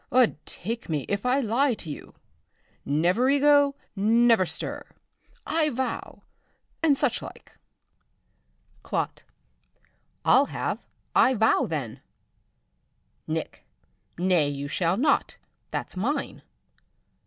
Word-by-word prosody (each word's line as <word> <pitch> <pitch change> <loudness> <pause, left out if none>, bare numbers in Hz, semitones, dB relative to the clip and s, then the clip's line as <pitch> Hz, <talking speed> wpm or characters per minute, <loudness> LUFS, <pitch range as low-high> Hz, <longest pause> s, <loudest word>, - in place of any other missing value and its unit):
'Ud 240 - +3
take 230 +4 -5
me! 150 -4 -1
if 200 +4 -2
I 260 +3 +3
lie 245 +2 +2
to 180 - -10
you. 145 - -8 0.7
Nev'rigo! 275 - +3 0.2
nev'rstir! 225 -1 +2 0.6
I 315 -2 +1
vow! 260 -1 -4 0.6
and 300 -4 +4
such - - 0
like. - - -11 1.3
"Clot. - - -3 1.0
I'll - - +6
have - - -4 0.3
I 260 - +5
vow, 220 0 +3
then. 140 -9 -4 1.3
"Nick. - - -4 0.5
Nay, 175 -4 +2
but 140 - -5
you 140 +1 -4
shall 170 +5 0
not, 285 +4 +1 0.3
that's - - -4
mine. 275 +10 -2
225 Hz, 100 wpm, -26 LUFS, 175-270 Hz, 1.3 s, I'll